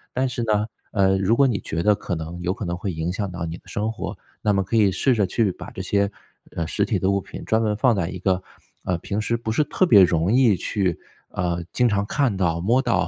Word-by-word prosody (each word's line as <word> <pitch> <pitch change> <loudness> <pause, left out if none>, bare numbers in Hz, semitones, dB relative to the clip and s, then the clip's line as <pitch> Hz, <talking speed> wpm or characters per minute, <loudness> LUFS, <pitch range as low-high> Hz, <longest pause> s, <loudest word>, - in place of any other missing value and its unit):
但 130 +1 +1
是 120 -1 -3
呢， 105 -1 +1 0.2
呃， 95 -2 +3
如 95 +4 +2
果 140 +2 +5
你 115 -6 0
觉 80 - -3
得 105 +3 +4
可 95 - -5
能 80 +1 -5
有 90 +1 0
可 105 - -6
能 85 0 -2
会 95 0 -3
影 80 +2 -2
响 100 0 -3
到 85 -1 -4
你 80 +1 -5
的 - - -21
生 105 +2 -2
活， 115 - -5 0.3
那 105 - +3
么 95 -1 +1
可 95 - -3
以 105 -3 +4
试 125 +7 +2
着 105 -3 +2
去 105 +1 +1
把 - - -10
这 - - -6
些， 100 +1 +1 0.4
呃， 85 -1 -2
实 100 +4 0
体 100 -2 0
的 95 - +1
物 100 0 +2
品 95 - -9
专 110 - +2
门 105 -1 +1
放 115 +2 +3
在 90 -4 -1
一 90 0 -6
个， 95 0 0 0.4
呃， 90 - 0
平 100 +4 -3
时 110 +2 0
不 115 -1 -3
是 150 - +2
特 185 +5 +1
别 100 - +8
容 85 +1 +2
易 120 -4 +5
去， 95 -1 -1 0.3
呃， 85 -1 -2
经 125 -1 +3
常 100 -1 0
看 120 -2 0
到、 85 -3 +1
摸 115 +8 +3
到 115 -8 +1
100 Hz, 280 characters per minute, -23 LUFS, 90-110 Hz, 0.4 s, 别